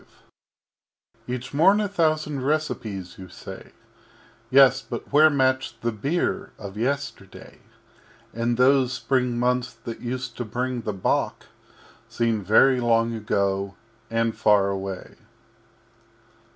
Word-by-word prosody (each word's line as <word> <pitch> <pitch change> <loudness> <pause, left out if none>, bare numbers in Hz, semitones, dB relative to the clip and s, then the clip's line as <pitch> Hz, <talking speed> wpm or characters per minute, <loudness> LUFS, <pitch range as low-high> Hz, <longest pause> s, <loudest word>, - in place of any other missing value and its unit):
V 125 - -2
Each 125 +1 -8
morn 190 +8 +5
a 210 - 0
thousand 155 -6 0
Recipes, 120 - -3
you 95 -1 -10
say - - -10 0.8
Yes, 135 -1 +6
but - - -8
where 155 +2 +7
match 130 -4 0
the 115 - 0
beer 175 - -2
of 100 -2 -9
Yesterday? 135 +6 -4 0.7
And 115 +1 -1
those 130 0 +4
Spring 125 -2 0
Months 125 +1 0
that 115 -1 -6
used 125 +1 -4
to 120 - -2
bring 125 +2 -3
the 105 - -3
Bock 95 - -1 0.6
Seem 115 -3 0
very 125 +6 +5
long 115 -1 +2
ago 100 -3 -1 0.3
and 115 0 0
far 105 -2 +3
away. 95 -1 -5
125 Hz, 120 wpm, -24 LUFS, 110-135 Hz, 0.8 s, where